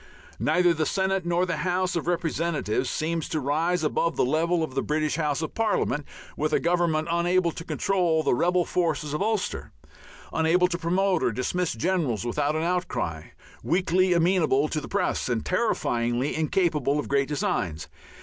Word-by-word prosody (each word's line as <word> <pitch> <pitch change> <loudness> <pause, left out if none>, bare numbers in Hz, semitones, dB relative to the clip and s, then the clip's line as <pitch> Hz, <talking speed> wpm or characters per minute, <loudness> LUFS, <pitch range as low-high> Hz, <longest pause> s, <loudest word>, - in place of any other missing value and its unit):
Neither 175 +3 +3
the 155 -1 -1
Senate 190 -2 0
nor 175 +1 +2
the 170 -3 -2
House 185 +1 0
of 170 -1 -2
Representatives 165 -8 -1
seem 165 +1 -1
to 155 0 -3
rise 160 +5 0
above 165 +2 0
the - - +2
level 165 +5 +1
of 155 - -4
the 135 - 0
British 155 0 -1
Houses 150 -1 -1
of 155 - -5
Parliament, 205 - 0 0.3
with 155 +1 -1
a - - +4
Government 170 -2 +1
unable 175 0 +2
to 165 - -8
control 175 -4 +1
the 140 - +2
rebel 175 +6 +2
forces 160 -4 -1
of 150 - -2
Ulster, 215 -1 -2 0.6
unable 165 +3 +3
to 170 -1 -3
promote 180 +2 +1
or - - +1
dismiss 160 +9 -1
generals 135 - -1
without 145 +5 0
an 155 - -1
outcry, 125 - -2 0.4
weakly 185 +1 +2
amenable 165 -5 +2
to 155 - -2
the - - -8
press, 195 -8 -1
and 115 -2 -1
terrifyingly 125 - 0
incapable 155 -3 +1
of - - -3
great 140 -1 +1
designs. 145 - -2
165 Hz, 170 wpm, -26 LUFS, 150-180 Hz, 0.6 s, a